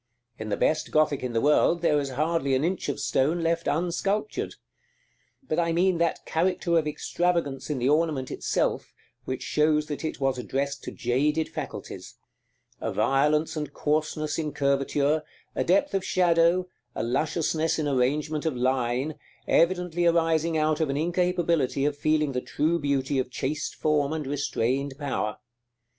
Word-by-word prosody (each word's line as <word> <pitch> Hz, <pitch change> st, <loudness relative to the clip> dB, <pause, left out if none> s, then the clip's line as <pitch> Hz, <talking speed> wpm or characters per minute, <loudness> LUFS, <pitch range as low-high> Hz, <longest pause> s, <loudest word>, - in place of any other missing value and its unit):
In 110 Hz, 0 st, -5 dB
the 100 Hz, -, -1 dB
best 155 Hz, 0 st, +1 dB
Gothic 155 Hz, -2 st, +2 dB
in 125 Hz, -2 st, -3 dB
the 115 Hz, -, +1 dB
world 165 Hz, +3 st, +3 dB
there 150 Hz, -3 st, +3 dB
is 140 Hz, -1 st, -3 dB
hardly 145 Hz, 0 st, 0 dB
an 130 Hz, -, +1 dB
inch 180 Hz, -2 st, -1 dB
of 140 Hz, -, -2 dB
stone 160 Hz, +6 st, +1 dB
left 165 Hz, 0 st, 0 dB
unsculptured. 195 Hz, +6 st, -1 dB, 0.9 s
But 155 Hz, -, 0 dB
I 170 Hz, -1 st, +1 dB
mean 180 Hz, 0 st, +2 dB
that 170 Hz, -1 st, 0 dB
character 170 Hz, 0 st, 0 dB
of 155 Hz, -, -3 dB
extravagance 155 Hz, -2 st, -1 dB
in 150 Hz, -, -1 dB
the 125 Hz, 0 st, 0 dB
ornament 150 Hz, -4 st, +1 dB
itself -, -, -1 dB, 0.3 s
which 130 Hz, 0 st, -4 dB
shows 150 Hz, 0 st, +2 dB
that 145 Hz, -2 st, -5 dB
it 160 Hz, -, -3 dB
was 135 Hz, -2 st, 0 dB
addressed 140 Hz, +2 st, -3 dB
to -, -, -5 dB
jaded 150 Hz, +6 st, 0 dB
faculties; -, -, -7 dB, 0.6 s
a -, -, -2 dB
violence 150 Hz, +4 st, +2 dB
and 150 Hz, -2 st, -4 dB
coarseness 155 Hz, +1 st, -1 dB
in 150 Hz, -2 st, -3 dB
curvature, 140 Hz, +2 st, +1 dB, 0.3 s
a -, -, 0 dB
depth 200 Hz, +12 st, +2 dB
of 195 Hz, -1 st, 0 dB
shadow, 175 Hz, 0 st, +3 dB, 0.3 s
a -, -, -2 dB
lusciousness 155 Hz, +5 st, 0 dB
in 155 Hz, -2 st, -1 dB
arrangement 145 Hz, +4 st, 0 dB
of 155 Hz, -, -1 dB
line, 130 Hz, +3 st, 0 dB, 0.3 s
evidently 175 Hz, 0 st, +2 dB
arising 165 Hz, -1 st, +2 dB
out 155 Hz, 0 st, +1 dB
of 160 Hz, -3 st, 0 dB
an 140 Hz, -, -1 dB
incapability 170 Hz, -4 st, +1 dB
of 145 Hz, 0 st, 0 dB
feeling 155 Hz, 0 st, +1 dB
the 125 Hz, -1 st, -2 dB
true 165 Hz, +6 st, 0 dB
beauty 140 Hz, -2 st, 0 dB
of 130 Hz, -1 st, -2 dB
chaste 135 Hz, +4 st, -3 dB
form 150 Hz, -1 st, +1 dB
and 155 Hz, -2 st, -3 dB
restrained 135 Hz, -1 st, -1 dB
power. 105 Hz, -8 st, -2 dB
150 Hz, 160 wpm, -26 LUFS, 140-165 Hz, 0.9 s, world